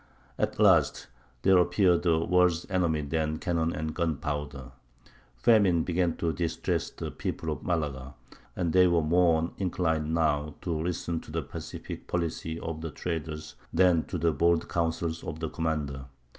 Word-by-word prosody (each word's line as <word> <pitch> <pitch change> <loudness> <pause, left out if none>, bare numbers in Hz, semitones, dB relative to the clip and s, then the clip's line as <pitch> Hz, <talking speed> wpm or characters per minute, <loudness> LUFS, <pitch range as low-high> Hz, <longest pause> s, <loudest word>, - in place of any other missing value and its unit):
At - - 0
last - - +4 0.4
there 95 -1 +6
appeared 90 0 +3
a 80 -1 +4
worse 90 -2 +3
enemy 85 -5 +1
than 80 +1 -1
cannon 85 -1 0
and 80 -1 -3
gunpowder: 75 -5 -3 0.6
famine 95 - +4
began 90 -1 0
to 80 -1 0
distress 85 -2 -1
the - - -6
people 80 -1 -4
of 75 - -4
Malaga, 70 -6 -2 0.4
and 85 -3 -1
they 90 0 +6
were 85 -2 +2
more 85 0 +3
inclined 80 -5 0
now 75 -2 +1
to 85 - -2
listen 85 +1 -2
to - - -12
the - - -2
pacific - - -8
policy 80 -1 -2
of 80 -1 -5
the 80 - -4
traders 75 -1 -5 0.2
than 85 -2 +4
to 90 - -4
the 85 0 +2
bold 85 +3 +2
counsels 85 -1 -1
of 80 -1 -5
the 80 -1 -3
commander. 75 -5 -2
80 Hz, 155 wpm, -28 LUFS, 80-85 Hz, 0.6 s, there